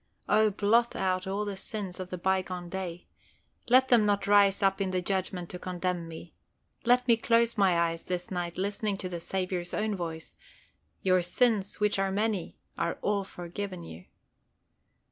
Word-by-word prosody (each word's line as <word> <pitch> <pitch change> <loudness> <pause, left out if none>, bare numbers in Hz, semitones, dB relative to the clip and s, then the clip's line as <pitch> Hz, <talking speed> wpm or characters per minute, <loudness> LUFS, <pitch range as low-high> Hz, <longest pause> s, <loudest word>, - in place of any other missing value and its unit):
O 215 +1 +4
blot 220 +4 +2
out 185 0 0
all 200 +2 -1
the 205 -1 -4
sins 190 -1 -4
of 185 -1 -5
the 180 - -4
bygone 185 -1 -1
day. 180 -2 -5 0.6
Let 260 +2 +5
them 235 -3 +6
not 205 -1 +1
rise 200 -1 +4
up 195 0 +2
in 195 - 0
the 185 0 0
Judgment 185 -1 -2
to 180 - -6
condemn 180 -1 -3
me. 165 +1 -10 0.5
Let 250 +1 +4
me 235 - +6
close 230 0 +2
my 195 -5 +3
eyes 165 -1 0
this 180 0 -4
night 175 -2 -3
listening 200 +1 -1
to 185 - -5
the 175 -1 -4
Saviour's 180 0 -3
own 215 0 0
voice 165 -3 -6 0.7
"Your 185 -1 +4
sins 205 +2 +1
which 210 -1 +2
are 195 0 +1
many 205 -2 -1 0.2
are 170 - -1
all 200 -1 +1
forgiven 180 0 -6
you." 85 - -10
190 Hz, 170 wpm, -29 LUFS, 180-205 Hz, 0.7 s, them